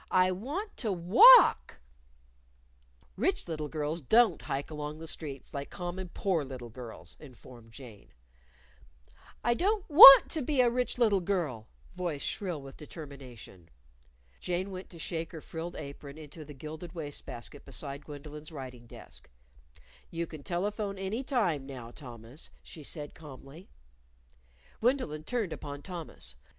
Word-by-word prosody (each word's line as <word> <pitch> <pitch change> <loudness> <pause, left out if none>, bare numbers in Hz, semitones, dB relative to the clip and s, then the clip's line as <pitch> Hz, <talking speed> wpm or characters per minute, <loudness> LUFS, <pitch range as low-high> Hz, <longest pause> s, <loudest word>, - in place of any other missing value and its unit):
I 185 0 +4
want 285 - -5
to 220 -5 -1
walk. 225 - +7 1.4
"Rich - - 0
little 155 -3 -4
girls 155 +2 -3
don't 220 - +4
hike 140 +3 -4
along 150 0 -5
the 165 - -9
streets 145 -4 -5
like 140 0 -5
common 180 0 -5
poor 175 -4 0
little 130 -3 -8
girls," 110 -8 -9
informed 125 -4 -14
Jane. 115 -4 -13 1.3
"I 240 - +3
don't 395 - 0
want 275 -2 +12
to 315 - -1
be 280 +1 -1
a 245 -2 +5
rich 250 +1 -1
little 215 -5 +3
girl," 170 - -2 0.3
voice 175 -6 -3
shrill 175 -8 -3
with 135 -1 -11
determination. 135 - -11 0.7
Jane 180 +2 -2
went 185 0 -8
to 170 - -13
shake 165 0 -4
her 160 - -6
frilled 165 +3 -7
apron 140 +1 -9
into 155 +1 -10
the 150 -1 -11
gilded 155 +5 -8
waste 145 -3 -6
basket 120 +4 -9
beside 140 0 -5
Gwendolyn's 150 +1 -9
writing 130 -5 -9
desk. - - -14 0.8
"You 170 0 -3
can 155 -2 -10
telephone 200 +5 -3
any 195 +6 -3
time 180 - 0
now, 125 -4 -8
Thomas," 120 0 -10
she 160 - -11
said 145 0 -5
calmly. 150 +2 -13 1.1
Gwendolyn 225 - 0
turned 230 -9 -2
upon 145 0 -8
Thomas. 165 - -8
160 Hz, 140 wpm, -30 LUFS, 140-190 Hz, 1.4 s, want